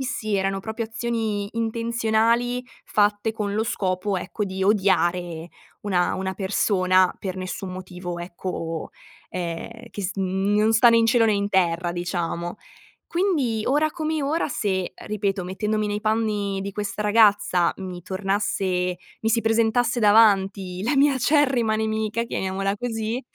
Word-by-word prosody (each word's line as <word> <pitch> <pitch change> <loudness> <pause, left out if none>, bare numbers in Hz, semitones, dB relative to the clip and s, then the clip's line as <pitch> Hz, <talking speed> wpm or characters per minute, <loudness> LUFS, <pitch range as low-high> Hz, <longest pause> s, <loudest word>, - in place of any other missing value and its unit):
Sì - - -2
sì, 215 -5 -2
erano 195 0 -1
proprio 220 +3 -4
azioni 225 -3 -2
intenzionali 230 +1 +1 0.2
fatte 205 +1 +1
con 210 -2 -3
lo 220 +1 +1
scopo, 190 -1 -1
ecco, 185 +3 -3
di 190 -1 -4
odiare 180 -4 +1 0.3
una 180 -4 +1
una 190 0 -3
persona 185 -2 +2
per 190 -2 -4
nessun 185 +1 -5
motivo, 180 -1 -6
ecco, 170 -2 -5 0.4
ehm, 180 +6 -5
che 205 - -6
s 190 +1 -2
n 190 +1 0
non 215 +1 +3
sta 230 +2 +6
né 230 0 +5
in 225 - +3
cielo 230 0 +4
né 220 - +3
in 200 0 0
terra, 175 -3 +1
diciamo. 175 0 -3 0.5
Quindi, 295 - 0
ora 300 +4 +2
come 315 -1 -2
ora, 295 +4 0
se, 190 -8 -1
ripeto 200 -2 -2
mettendomi 210 +4 -1
nei 205 0 -2
panni 210 -2 0
di 195 +1 -4
questa 205 +1 -4
ragazza, 205 -5 +4
mi 185 -2 -6
tornasse 190 -1 -1 0.3
mi 225 - +1
si 230 - +3
presentasse 230 +2 +2
davanti 200 -4 +4
la 245 - +1
mia 280 +1 +4
acerrima 260 -4 +2
nemica, 220 +1 -1
chiamiamola 195 -2 -2
così, 225 +1 -3
205 Hz, 145 wpm, -24 LUFS, 185-225 Hz, 0.5 s, sta